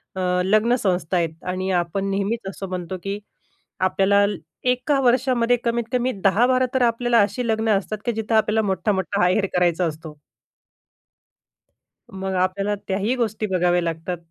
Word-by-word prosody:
अ, 190 - -3 0.2
लग्न 215 +5 +3
संस्था 180 -6 0
आहेत 165 -1 -2
आणि 185 +1 -2
आपण 180 +2 -1
नेहमीच 200 +2 -2
असं 195 0 -7
म्हणतो, 185 0 -4
की 200 +1 -3 0.6
आपल्याला 195 +2 +3 0.4
एका 255 +3 +1
वर्षामध्ये 245 -1 +2
कमीतकमी 235 +2 0
10-12 245 +6 +3
तर 260 - +2
आपल्याला 235 0 +2
अशी 235 +4 -1
लग्नं 220 -2 +2
असतात, 210 +2 -4
की 240 - +1
जिथं 220 0 -1
आपल्याला 220 0 +3
मोठ्ठा-मोठ्ठा 195 0 0
आहेर 190 +3 +2
करायचा 180 0 +2
असतो. 155 -1 -6 2.0
मग 190 0 -4
आपल्याला 190 +3 0
त्याही 205 +5 0
गोष्टी 220 -3 -1
बघाव्या 175 0 +2
लागतात. 165 +1 -3
200 Hz, 140 wpm, -22 LUFS, 185-235 Hz, 2.0 s, लग्न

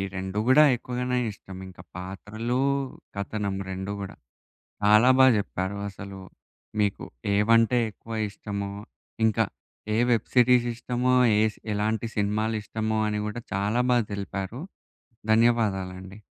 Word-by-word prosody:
ఈ - - -1
రెండు 95 +2 -3
గూడా 135 +4 +7
ఎక్కువగానే 125 +1 -2
ఇష్టమింకా 95 -2 -10
పాత్రలు, 105 +6 -4 0.6
కథనం 100 0 -3
రెండు 95 +2 -4
గూడా. 100 - -7 0.7
చాలా 105 +5 +6
బా 130 - +8
చెప్పారు 100 0 -3
అసలు. 100 0 -9 0.6
మీకు 100 -1 0 0.3
ఏవంటే 115 +3 +4
ఎక్కువ 115 +2 -12 0.2
ఇష్టమో, 100 -1 -5 0.5
ఇంకా 110 - +2 0.5
ఏ - - +1
వెబ్ 115 - +2
సిరీస్ 125 0 +5
ఇష్టమో, 125 +2 0 0.3
ఏస్ 110 -1 +1 0.2
ఎలాంటి 110 +2 0
సినిమాలిష్టమో 110 +1 -1
అని 105 0 -1
గూడా 110 +2 -5
చాలా 105 +5 +1
బా 125 - +5
తెలిపారు. 100 +4 -4 0.7
ధన్యవాదాలండి. 100 -4 +1
105 Hz, 115 wpm, -26 LUFS, 100-115 Hz, 0.7 s, బా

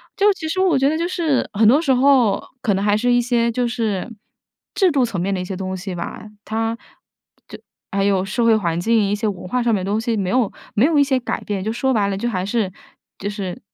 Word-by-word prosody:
就 415 +1 +4
其 320 -4 -6
实 330 +4 -2
我 370 -6 +3
觉 270 +1 +3
得 305 - +1
就 335 +2 -1
是 325 -7 0
很 215 +1 +4
多 275 +8 +5
时 290 -5 +1
候 255 -4 +4 0.2
可 220 -7 +1
能 195 +1 -1
还 205 0 +3
是 245 +3 +1
一 245 - +4
些 235 -1 +1
就 245 +1 0
是 225 -5 -2 0.7
制 380 -4 +3
度 275 -4 +2
层 225 -6 -2
面 195 +3 -1
的 185 - -2
一 - - -4
些 185 0 -5
东 190 0 -4
西 185 0 -6
吧。 170 - -6 0.2
它 225 +1 -2 0.7
就 - - -9 0.3
还 195 0 0
有 195 -2 +2
社 210 +5 -1
会 225 -1 +5
环 170 -6 -1
境， 220 +1 +2
一 205 - +1
些 215 +1 -2
文 190 -3 -5
化 250 +6 0
上 235 -1 +2
面 195 -3 0
的 195 - -3
东 210 - +1
西， 230 0 -1
没 195 -4 -1
有 245 -3 +1 0.2
没 220 - +4
有 310 -1 +3
一 - - +6
些 270 -2 +1
改 250 - -4
变， 200 -2 -3
就 215 - -1
说 265 +3 0
白 210 -5 +2
了， 195 - -2
就 235 +5 -2
还 185 -4 -2
是 205 -2 -1 0.5
就 200 - -5
是， 200 -3 -5
225 Hz, 280 characters per minute, -20 LUFS, 195-255 Hz, 0.7 s, 一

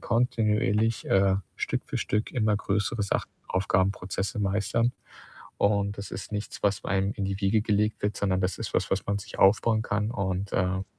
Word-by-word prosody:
kontinuierlich, 110 -2 +1
äh, 95 0 +4 0.2
Stück - - -1
für - - -3
Stück, 105 +2 -1
immer 110 -5 +2
größere 105 +2 -1
Sachen, 100 - -1 0.2
Aufgaben, 95 0 +2
Prozesse 95 +3 -4
meistern.“ 105 +4 +1 0.7
Und 100 0 +2
das 100 - -6
ist 95 - -6
Nichts, 105 0 -5
was 100 -1 +1
einem 95 +1 +1
in 100 - -3
die 95 0 -3
Wiege 105 +2 +2
gelegt 105 0 0
wird, 105 0 0
sondern 95 -2 +1
das 90 -1 -1
ist - - -5
was, - - +1
was 95 - 0
man 100 0 0
sich 100 - -10
aufbauen 110 +3 +4
kann. 105 0 -1
Und, 95 -1 -2
ähm 95 +1 0
100 Hz, 180 wpm, -27 LUFS, 95-105 Hz, 0.7 s, äh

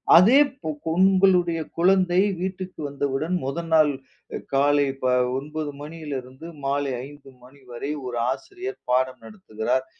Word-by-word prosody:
அதே 195 +10 +7
இப் 275 - -8 0.3
உங்களுடைய 185 -2 +4 0.2
குழந்தை 180 0 +3 0.2
வீட்டிற்கு 185 0 -5
வந்தவுடன், 140 +4 -2
முதல் 165 +5 -4
நாள் 155 -2 +5 0.6
காலை 145 +1 +3 0.5
9:00 150 +1 -4
மணியிலிருந்து 145 -2 -7 0.2
மாலை 140 0 0 0.2
5:00 145 -1 -15
மணி 135 +3 -17
வரை 120 +4 -5
ஒரு 125 -1 -4
ஆசிரியர் 385 - -6
பாடம் 130 +1 +1
நடத்துகிறார். 130 - -3
155 Hz, 115 wpm, -24 LUFS, 135-185 Hz, 0.6 s, அதே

